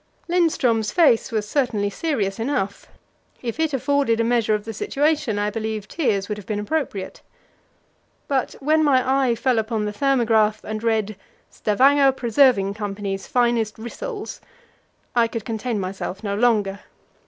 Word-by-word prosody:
Lindström's 300 -11 +1
face 285 -8 +3
was 215 -2 -1
certainly 210 -6 0
serious 210 -8 -2
enough; 225 -5 -2 0.6
if 235 +4 -4
it 320 -1 +1
afforded 275 -3 +1
a - - +3
measure 230 -2 +2
of 210 0 -5
the 225 - -5
situation, 300 - 0
I 205 0 0
believe 220 -1 -4
tears 205 - 0
would 210 -1 -4
have 200 - -13
been 210 - -2
appropriate. 210 -5 -3 1.1
But 270 -4 0
when 310 +3 +1
my 265 -1 +3
eye 235 - +2
fell 250 0 +1
upon 220 -1 -2
the 210 - -3
thermograph 220 -4 +2
and 215 0 -5
read, 220 -3 0 0.3
"Stavanger 270 +5 +3
Preserving 240 -5 +3
Co.'s 200 -2 -4
finest 235 -3 +1
rissoles," 415 - -6 0.8
I 235 -1 +4
could 230 -2 -6
contain 225 0 -2
myself 190 +1 -5
no 200 -2 -2
longer. 205 -4 +1
230 Hz, 145 wpm, -22 LUFS, 210-270 Hz, 1.1 s, I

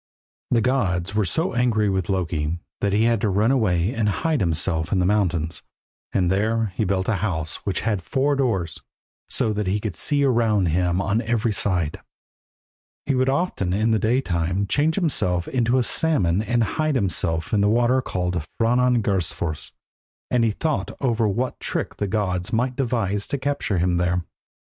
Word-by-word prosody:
The 115 - +3
gods 100 -7 0
were 105 -1 +1
so 160 - 0
angry 120 -4 +2
with 95 -3 -1
Loki 85 -4 -1 0.2
that 100 - 0
he 105 +3 +2
had 115 -2 +2
to 105 - +1
run 105 +5 +2
away 100 -5 +1
and 110 -2 +1
hide 155 - 0
himself 80 -2 0
in 100 - +2
the 90 - +2
mountains, 90 -5 0 0.5
and 90 -2 +1
there 110 +1 0
he 110 - 0
built 95 0 0
a 110 - +1
house 80 -6 -2
which 95 - 0
had 105 -4 -1
four 140 +9 0
doors, 100 - -1 0.5
so 110 - +1
that 105 -2 -2
he 100 +3 +1
could 105 -4 -4
see 145 - +1
around 115 -8 +2
him 90 +2 +1
on 110 +3 +1
every 115 -1 0
side. 90 -6 -1 1.0
He 140 - +1
would 130 0 +2
often 135 - 0
in 110 +3 +1
the 110 - +2
day 120 +6 +2
time 90 -1 -1
change 150 +9 +1
himself 90 - 0
into 120 0 +1
a 125 - +3
salmon 105 - +1
and 120 +2 +1 0.2
hide 155 -3 +2
in 100 - +1
the 90 +4 +1
water 120 +3 +3
called 90 -7 -2 0.2
Franangursfors, 115 -10 0 0.6
and 125 -2 +3
he 115 - +3
thought 150 +7 -2
over 115 -4 +1
what 120 +6 -2
trick - - -3
the 100 - -1
gods 90 -3 -1
might 125 +3 0
devise 115 -7 -1
to 140 - -2
capture 140 -7 -1
him 90 0 +1
there. 90 0 0
105 Hz, 175 wpm, -23 LUFS, 90-120 Hz, 1.0 s, The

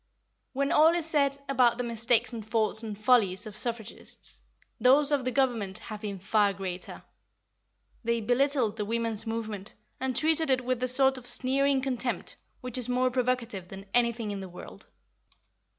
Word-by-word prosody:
When 280 +1 -1
all 320 +3 +5
is 345 -2 -1
said 280 -3 +1
about 250 -3 +3
the 250 - -2
mistakes 235 +1 +1
and 225 -2 -6
faults 220 0 +1
and 215 -3 -6
follies 215 -4 +2
of 215 -1 -9
suffragists, 230 0 -3 0.4
those 275 +5 +5
of 280 -3 0
the 255 - 0
Government 235 -7 0
have 215 -1 -9
been 205 -3 -5
far 200 +2 +1
greater. 185 -1 -6 1.0
They 235 0 0
belittled 245 -1 0
the 210 - -2
women's 225 0 -1
movement, 220 -3 -5 0.2
and 260 -1 -2
treated 320 0 +2
it 255 -1 +1
with 255 -1 -1
the 255 - -1
sort 265 +1 +4
of 250 - -11
sneering 270 +1 +3
contempt 255 -2 -3 0.3
which 250 0 +2
is 250 0 +1
more 255 +1 +1
provocative 245 -6 -2
than 195 +1 -10
anything 235 -3 +1
in 200 - -5
the 190 -1 -8
world. 180 - -12
240 Hz, 165 wpm, -28 LUFS, 215-260 Hz, 1.0 s, all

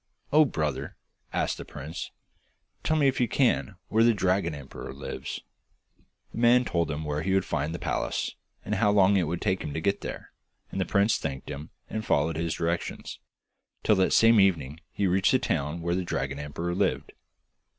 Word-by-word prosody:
'Oh, 155 +1 +7
brother!' 75 - -2 0.4
asked - - -1
the - - -5
prince, 75 +3 -7 0.7
'tell 155 - +2
me, 145 -2 +4
if 135 -1 +1
you 120 - +3
can, 110 -5 +1
where 110 +2 +3
the 115 -1 +5
dragon 90 -4 +1
emperor 70 -2 -8
lives?' 70 - -6 0.9
The - - -6
man 120 +1 +5
told 85 -6 0
him 75 +1 -3
where 75 0 -1
he 95 +3 +1
would 95 - +2
find 75 +3 -1
the 85 - -3
palace, - - -2 0.3
and 105 - -2
how 105 0 +3
long 100 -1 +5
it 90 -5 +2
would 85 +2 -3
take 95 -2 0
him 75 -2 -5
to - - 0
get 100 +4 0
there, - - -7 0.4
and 95 - -2
the - - +1
prince 100 +4 +3
thanked 70 -2 -5
him, 75 +2 -7 0.2
and 110 - -4
followed 80 -1 +1
his 80 0 -1
directions, 85 0 -3 0.6
till 105 - +4
that 95 - +3
same 115 -1 +6
evening 80 -7 +2
he 100 - -1
reached 95 +4 +3
the - - +6
town 80 - -2
where 85 +1 0
the 95 - 0
dragon 70 -5 -3
emperor 80 +4 -3
lived. 90 - 0
90 Hz, 190 wpm, -27 LUFS, 75-105 Hz, 0.9 s, Oh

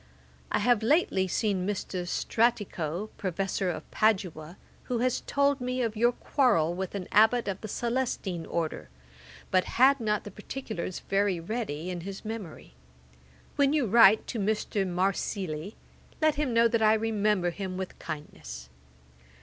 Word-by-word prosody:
'I - - +2
have 240 0 +3
lately 225 - +2
seen 195 -1 0
Mr. 190 -3 -3
Stratico, 205 -4 0
Professor 190 0 -1
of 175 - -4
Padua, 180 -6 0 0.3
who 245 - -1
has 250 +1 0
told 280 -1 +2
me 250 0 -1
of 225 -2 -2
your 240 +3 +3
quarrel 210 - +2
with 190 +2 -4
an 185 -3 -4
Abbot 220 +2 +4
of 195 -1 -3
the 215 - -5
Celestine 235 -7 -2
order; 160 - -3 0.6
but 185 -1 +3
had 270 +3 +6
not 210 -2 0
the 205 - -8
particulars 210 -4 -6
very 195 -2 +1
ready 180 -4 -4
in 175 -1 -5
his 195 +4 -8
memory. 215 - -7 0.8
When 280 0 +4
you 295 -5 +2
write 220 -1 +6
to 235 - -4
Mr. 205 -1 0
Marsili, 185 -1 -2 0.4
let 310 -1 +4
him 290 -3 -1
know 230 0 +5
that 230 -1 0
I 215 0 +5
remember 210 -4 +1
him 185 0 -5
with 190 -1 -6
kindness. 75 - -8
205 Hz, 150 wpm, -28 LUFS, 180-235 Hz, 0.8 s, had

